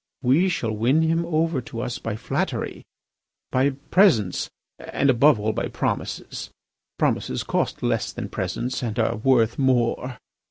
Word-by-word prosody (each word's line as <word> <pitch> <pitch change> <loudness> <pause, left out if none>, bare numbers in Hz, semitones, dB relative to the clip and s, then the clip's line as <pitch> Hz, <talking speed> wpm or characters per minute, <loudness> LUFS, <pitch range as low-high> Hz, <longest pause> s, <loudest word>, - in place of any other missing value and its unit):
We 150 +10 +4
shall 120 -10 -1
win 120 +9 +2
him 165 +1 +1
over 160 -3 +1
to 115 -1 -6
us 125 -1 -3
by 115 -2 -3
flattery, - - -3 0.7
by 130 +2 +3 0.2
presents, 130 - +4 0.3
and 140 0 +1
above 135 0 +5
all 110 +1 0
by - - -2
promises. - - -3 0.5
Promises 65 - 0
cost - - -1
less - - 0
than - - -6
presents, 125 +2 -3
and 115 -2 -3
are 115 -1 +1
worth 115 0 +2
more. 125 -1 +1
125 Hz, 145 wpm, -24 LUFS, 115-150 Hz, 0.7 s, above